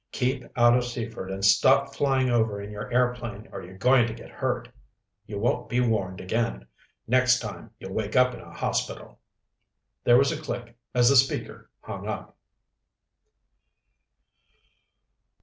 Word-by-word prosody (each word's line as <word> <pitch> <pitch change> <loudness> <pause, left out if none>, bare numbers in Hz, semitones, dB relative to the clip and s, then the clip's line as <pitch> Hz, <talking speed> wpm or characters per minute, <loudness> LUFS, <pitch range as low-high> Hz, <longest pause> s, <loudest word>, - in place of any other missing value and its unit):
Keep 130 0 -1
out 120 0 +6
of 125 - +2
Seaford 115 -5 -5
and 95 +1 -2
stop 100 - +4
flying 135 -2 +1
over 110 -3 +1
in 100 +1 -7
your 105 +2 -7
airplane 120 -3 -1
or - - -7
you're 95 +2 -12
going 125 +2 +4
to 110 - -5
get - - -12
hurt. - - -2 0.6
You 105 -1 -5
won't 115 +4 -1
be 125 - +1
warned 105 -6 0
again. 95 - -2 0.4
Next 130 +1 +4
time, 105 -3 -7
you'll 95 - -8
wake 110 +1 -3
up 125 0 +4
in - - -9
a - - -13
hospital!" - - -3 0.8
There 120 0 +6
was 135 +1 +4
a - - -4
click 120 -1 -6 0.2
as 120 -1 +5
the 140 - +4
speaker 135 +1 +1
hung - - -7
up. - - -5
120 Hz, 150 wpm, -26 LUFS, 105-125 Hz, 0.8 s, out